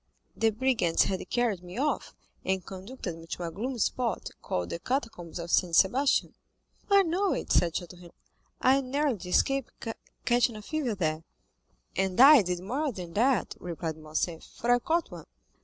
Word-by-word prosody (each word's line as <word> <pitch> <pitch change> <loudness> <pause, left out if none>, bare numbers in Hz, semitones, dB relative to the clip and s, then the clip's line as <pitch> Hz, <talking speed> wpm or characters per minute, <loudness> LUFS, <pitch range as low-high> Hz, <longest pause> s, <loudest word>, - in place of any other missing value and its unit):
The 225 - +3
brigands 220 -7 +2
had 190 -1 -3
carried 235 -7 0
me 180 +3 -10
off, 295 +3 -1 0.3
and 190 -1 -1
conducted 190 -1 -7
me 165 - -12
to 175 - -5
a 170 - -3
gloomy 245 +9 -4
spot, 235 +2 -1
called 90 -1 -3
the - - -3
Catacombs 215 - -3
of 170 0 -5
Saint 175 -3 +3
Sebastian." 255 - +3 0.6
"I 400 -1 +6
know 370 +3 +1
it," - - -4
said 170 -2 +3
Château 175 0 -4
Renaud; 170 -1 -14 0.5
"I 265 +2 +4
narrowly 275 -2 0
escaped 270 +7 +2 0.6
catching 240 -1 +3
a 215 - -8
fever 280 -4 -2
there." 155 -3 -1 0.7
"And 190 +1 0
I 275 0 +10
did 180 -2 -2
more 270 +9 -1
than 180 -6 -8
that," 240 +2 +2
replied 165 -2 -4
Morcerf, 155 +2 -3
"for 240 - -2
I 245 - +5
caught 330 +6 0
one. - - -10
215 Hz, 170 wpm, -28 LUFS, 175-265 Hz, 0.7 s, I